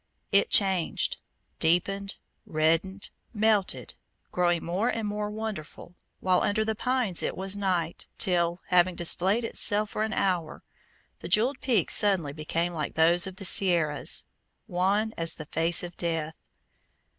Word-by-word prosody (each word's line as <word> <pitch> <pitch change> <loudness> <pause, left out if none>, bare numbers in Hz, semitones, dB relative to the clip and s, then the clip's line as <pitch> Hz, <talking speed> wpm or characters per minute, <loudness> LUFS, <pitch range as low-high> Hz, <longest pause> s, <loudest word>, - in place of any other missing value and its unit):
It 480 - +3
changed, 190 -4 +3 0.4
deepened, 195 +4 0 0.3
reddened, 165 +5 0 0.2
melted, 210 -2 +1 0.4
growing 175 -2 0
more 185 +8 -1
and 225 -3 -2
more 210 0 -3
wonderful, 210 -6 -7 0.3
while 185 -1 +2
under 215 +2 0
the 220 - -1
pines 245 -5 0
it - - -3
was 190 +1 0
night, 180 -5 -2
till, 175 -1 0
having 180 0 +3
displayed 190 +6 +2
itself 210 -1 +1
for - - -3
an 220 0 -1
hour, 175 -5 -2 0.6
the - - -7
jewelled 235 +8 +2
peaks 230 - +2
suddenly 190 -9 +2
became 165 +3 -3
like 150 -3 -4
those 170 +3 +4
of 190 - -8
the 195 - -7
Sierras, 170 -6 +2 0.4
wan 200 +5 0
as 165 -1 -2
the 155 - -8
face 165 +3 +1
of 175 0 -8
death. 165 -2 -2
185 Hz, 140 wpm, -27 LUFS, 170-210 Hz, 0.6 s, those